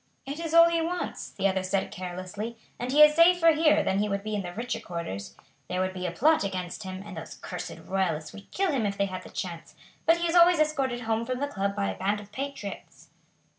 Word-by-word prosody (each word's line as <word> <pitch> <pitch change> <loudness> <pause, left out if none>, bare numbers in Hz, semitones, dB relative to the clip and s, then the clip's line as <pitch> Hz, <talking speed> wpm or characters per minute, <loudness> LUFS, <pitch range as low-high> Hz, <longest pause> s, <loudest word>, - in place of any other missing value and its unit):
"It 280 +3 -5
is 330 -1 -2
all 335 0 +9
he 335 -1 +1
wants," 350 +2 -3
the 195 - 0
other 190 -1 0
said 190 +1 -1
carelessly; 185 +5 -6 0.2
"and 245 +1 -3
he 300 +2 +8
is 300 0 +7
safer 335 +1 +6
here 310 0 +4
than 190 +1 +1
he 210 0 0
would 200 0 -2
be 215 0 -4
in 205 - 0
the 175 -2 -6
richer 235 +6 -3
quarters. 100 - -6 0.3
There 180 - -2
would 185 0 0
be 180 -1 -3
a - - -2
plot 300 - +3
against 185 -1 -4
him, 190 -1 -6
and 205 -3 -8
those 160 - -8
cursed 180 -2 -7
Royalists 185 -5 -1
would 200 -1 -12
kill 385 -2 0
him 245 -7 +1
if 200 0 -3
they 200 - +2
had 185 -1 -5
the - - -12
chance; 170 -3 -6 0.3
but 330 +1 +6
he 340 0 0
is 335 - -1
always 350 0 +7
escorted 275 -6 0
home 225 0 0
from 255 +2 -3
the 285 - 0
club 200 -7 -2
by 200 -1 0
a - - -8
band 205 +2 0
of 205 0 -13
patriots." 270 -4 -7
210 Hz, 245 wpm, -27 LUFS, 185-300 Hz, 0.3 s, all